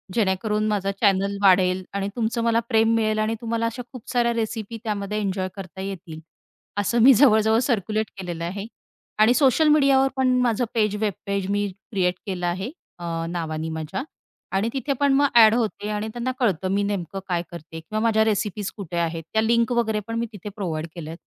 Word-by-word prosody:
जेणेकरून 210 +1 +1
माझा 200 -2 0
चॅनल 200 -1 +2
वाढेल 185 -1 +4
आणि 200 0 -1
तुमचं 230 0 -1
मला 230 0 +3
प्रेम 225 -1 +3
मिळेल 215 -1 +1
आणि 215 +1 0
तुम्हाला 230 0 -1
अशा 230 +2 -5
खूप 250 -4 -9
साऱ्या 240 -1 +2
रेसिपी 225 -1 -3
त्यामध्ये 210 -1 -2
एन्जॉय 190 -2 -1
करता 190 -1 -8
येतील. 185 -4 -6 0.6
असं 205 +4 +1
मी 270 +2 +9
जवळ-जवळ 220 -3 +5
सर्क्युलेट 215 -1 0
केलेलं 175 -3 -5
आहे. 195 +4 -4 0.5
आणि 220 +3 +6
सोशल 275 +3 +4
मीडियावर 275 -3 +5
पण 255 -1 +3
माझं 240 0 +1
पेज 210 -2 +2
वेब 210 -2 +1
पेज 200 -1 -2
मी 205 0 +1 0.2
क्रिएट 180 -3 +1
केलं 185 -3 -3
आहे 190 +7 -3 0.6
नावाने 160 -2 -3
माझ्या 160 - -4 0.5
आणि 210 +4 0
तिथे 275 +1 -1
पण 280 -1 +3
मग 285 +1 +4
एड 220 -1 +8
होते 220 -3 -2
आणि 210 +1 -2
त्यांना 245 +1 -2
कळतं 190 -7 +1
मी 200 +1 +1
नेमकं 195 -1 -3
काय 175 -2 0
करते? 165 -1 -9
किंवा 215 +7 -4
माझ्या 220 -1 +3
रेसिपीज 210 -2 -1
कुठे 180 -4 -5
आहेत 165 -1 -2
त्या 220 - +3
लिंक 235 +2 +2
वगैरे 220 -3 +1
पण 230 - -4
मी 235 - 0
तिथे 205 0 -7
प्रोव्हाईड 165 -6 -3
केल्यात. 165 -1 -7
210 Hz, 185 wpm, -24 LUFS, 190-230 Hz, 0.6 s, मी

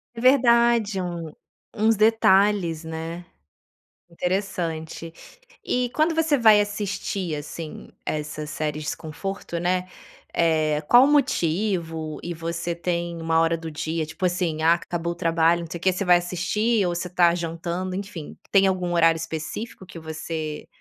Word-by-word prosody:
É 230 - -6
verdade! 235 -5 +4
Um 170 -3 -5 0.4
uns 220 +1 +3
detalhes, 200 -5 +3
né? 165 +2 -6 0.9
Interessante. 170 -3 -3 0.5
E 250 -1 0
quando 315 +2 +2
você 320 -3 +2
vai 220 -3 +7
assistir, 205 -4 -2
assim, 150 +2 -7 0.2
essas 150 0 -4
séries 150 0 -3
conforto, 170 +2 -5
né, 180 +1 0 0.4
eh, 155 -2 +2
qual 245 +2 +8
o - - +4
motivo 170 - 0
e 175 - -4
você 170 +1 -3
tem 170 -1 -3
uma 165 0 +2
hora 165 0 +2
do 165 -1 -6
dia, 160 +1 -3
tipo 160 +4 -6
assim: 175 -3 0
"Ah, 165 +1 +6
acabou 170 0 -3
o - - -9
trabalho, 165 0 +2
não - - -6
sei 170 - -4
o - - -21
que", 185 - +3
você 190 +2 -2
vai 180 -1 +6
assistir 185 +5 0
ou 175 - -1
você 175 +1 -3
está 175 -1 +4
jantando, 170 +2 -3
enfim. 190 -5 -7
Tem 195 -1 +5
algum 180 -2 0
horário 165 -1 +5
específico 165 +6 -6
que 170 - -11
você 160 -1 -5
175 Hz, 150 wpm, -24 LUFS, 165-195 Hz, 0.9 s, qual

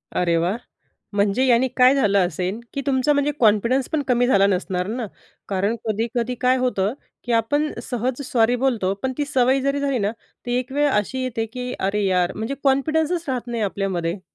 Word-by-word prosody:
अरे, 170 -1 +2
वाह! 175 +6 0 0.6
म्हणजे 205 +5 +2
याने 250 0 +4
काय 255 +1 +6
झालं 200 -8 +3
असेल, 180 +5 -3
की 275 - -2
तुमचा 270 +2 +2
म्हणजे 285 +1 +1
कॉन्फिडन्स 235 +4 +3
पण 310 - 0
कमी 245 -1 +3
झाला 200 -5 +4
नसणार 180 -1 -1
ना, 230 +1 -3 0.4
कारण 200 +3 0
कधी-कधी 235 +3 -1
काय 255 +1 +3
होतं, 245 -4 0 0.3
की 245 - -3
आपण 290 +7 +1
सहज 250 +2 -2
सॉरी 240 0 +2
बोलतो, 235 -7 0
पण 260 0 -1
ती 290 - 0
सवय 265 -1 +2
जरी 275 +1 0
झाली 275 -2 0
ना, 205 +1 0 0.3
ती 245 - -2
एक 255 +1 -7
वेळ 290 +1 +2
अशी 260 +3 -1
येते 225 -3 -2
की 250 -1 -4
"अरे, 200 +2 0
यार!" 180 -2 +1
म्हणजे 225 +6 -3
कॉन्फिडन्सच 315 +5 +1
राहत 250 -2 -2
नाही 235 -2 -3
आपल्यामध्ये. 190 -3 -2
245 Hz, 185 wpm, -22 LUFS, 200-265 Hz, 0.6 s, काय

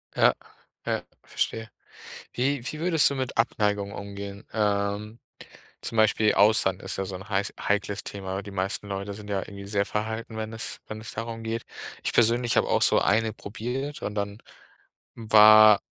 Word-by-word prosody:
Ja, - - +5 0.5
ja, - - -1 0.2
verstehe. 115 0 -3 0.6
Wie 130 +1 0
wie 155 - -7
würdest 165 -3 +3
du - - -3
mit 130 -3 -3
Abneigung 105 -3 +1
umgehen? 100 0 -7
Ähm, 105 +1 -1 0.6
zum 115 - -5
Beispiel 110 0 +4
Austern 100 -3 +4
ist - - -6
ja 95 - -1
so 95 0 -6
'n 95 +2 -9
heiß 100 -1 -1
heikles 100 -1 -1
Thema. 95 -1 -5
Die 100 - -10
meisten 100 +2 -3
Leute 100 +1 -4
sind 105 0 -10
ja 100 - 0
irgendwie 100 -1 -9
sehr 100 -1 0
verhalten, 110 +1 -4
wenn 110 0 -4
es 110 - -6
wenn 110 0 -7
es 110 - -8
darum 115 0 -5
geht. 115 +1 -3 0.4
Ich - - -1
persönlich 120 +1 +3
habe - - +3
auch - - +2
so - - +4
1 110 +1 +2
probiert 125 +9 -5
und 105 - -4
dann 100 0 -3 0.8
war 110 -1 +7
105 Hz, 170 wpm, -26 LUFS, 100-115 Hz, 0.8 s, war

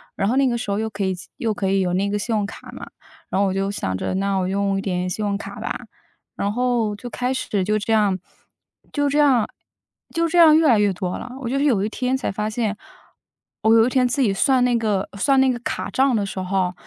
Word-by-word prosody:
然 195 - 0
后 245 - +1
那 275 - +4
个 240 -1 0
时 225 -4 -4
候， 200 - 0
又 220 0 -2
可 205 -2 -4
以 190 - 0 0.2
又 225 -2 -1
可 195 -2 -2
以 195 0 +2
有 180 -1 0
那 200 +2 0
个 205 - -1
信 225 +2 -1
用 210 -1 0
卡 200 - -10
嘛， - - -9 0.4
然 - - 0
后 200 - +3
我 190 - -1
就 195 0 -1
想 95 - -3
着 - - -3
那 195 0 0
我 185 - 0
用 195 0 0
一 - - -1
点 180 -2 -2
信 210 +4 -3
用 200 -1 0
卡 220 - -8
吧。 - - -4 0.5
然 200 - -1
后， 240 -2 0
就 245 +4 -8
开 250 +2 -2
始， 205 -6 -1
就 215 +3 +1
这 220 +2 -1
样 205 -3 +3 0.8
就 290 -1 +1
这 290 - +1
样 265 -6 +4 0.7
就 335 0 +1
这 350 +2 -1
样 320 -2 +8
越 320 -1 +4
来 235 -6 +5
越 205 -1 +3
多 180 0 -3
了。 - - -8
我 245 - -4
就 275 +2 0
是 290 - +1
有 220 -9 +2
一 - - -2
天 255 +3 -1
才 265 - -2
发 210 +2 -2
现， 215 -2 -1 0.9
我 220 +1 +5
有 225 0 +6
一 - - +1
天 255 -1 +2
自 245 - -2
己 210 -6 +2
算 255 +5 +3
那 250 -1 +2
个 210 -4 0
算 270 +4 +3
那 265 -1 +4
个 240 - -4
卡 - - -3
账 265 -2 +2
的 205 - 0
时 190 -1 -5
候， 185 -1 0
215 Hz, 280 characters per minute, -22 LUFS, 195-250 Hz, 0.9 s, 样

